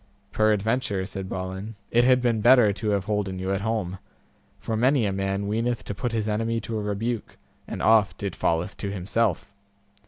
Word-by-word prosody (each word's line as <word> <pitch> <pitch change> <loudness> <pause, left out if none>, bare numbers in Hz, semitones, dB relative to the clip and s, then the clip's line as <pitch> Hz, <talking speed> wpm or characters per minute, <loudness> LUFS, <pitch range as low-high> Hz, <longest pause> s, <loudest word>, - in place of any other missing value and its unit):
Peradventure, 110 -1 +1
said 95 -1 -6
Balin, 95 +4 -5 0.2
it 120 +1 +4
had 125 0 +4
been 115 -3 +1
better 120 -3 +6
to 105 +2 -3
have 100 -2 0
holden 105 -3 -1
you 95 +1 -2
at 100 - -1
home, 100 -4 -2 0.6
for 115 - -3
many 125 +1 +3
a 100 - 0
man 95 +1 -1
weeneth 115 +3 -1
to - - -5
put 120 +4 -3
his 110 -2 -1
enemy 115 +2 0
to 110 +1 -3
a - - -3
rebuke, 105 +3 -3 0.3
and - - -5
oft 110 -3 +3
it 100 -3 -3
falleth 85 +4 0
to 100 - -4
himself. 100 +1 -1
105 Hz, 185 wpm, -25 LUFS, 95-115 Hz, 0.6 s, better